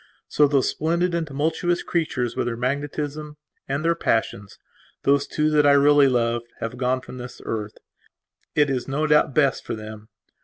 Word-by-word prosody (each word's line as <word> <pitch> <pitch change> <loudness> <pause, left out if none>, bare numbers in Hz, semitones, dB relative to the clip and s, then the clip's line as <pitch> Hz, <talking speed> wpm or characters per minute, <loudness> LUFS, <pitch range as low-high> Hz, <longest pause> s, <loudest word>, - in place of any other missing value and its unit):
So 150 - +3
those 140 -2 +2
splendid 170 +3 0
and 170 -2 -1
tumultuous 160 +5 -1
creatures 135 -8 -2
with - - -1
their 115 -1 -3
magnetism 145 +3 -3 0.3
and 140 +4 -2
their 170 - +4
passionsthose 115 +4 -2
two 155 0 0
that 150 -1 +4
I 140 - +6
really 145 0 +5
lovedhave 120 -1 -2
gone 130 0 0
from 125 - -10
this 125 0 -9
earth. 105 -2 -4 0.8
It 145 -2 +3
is 125 -2 -2
no 145 +3 -1
doubt 150 -2 +3
best 140 -5 +2
for - - -4
them. 110 0 -10
140 Hz, 160 wpm, -23 LUFS, 120-150 Hz, 0.8 s, I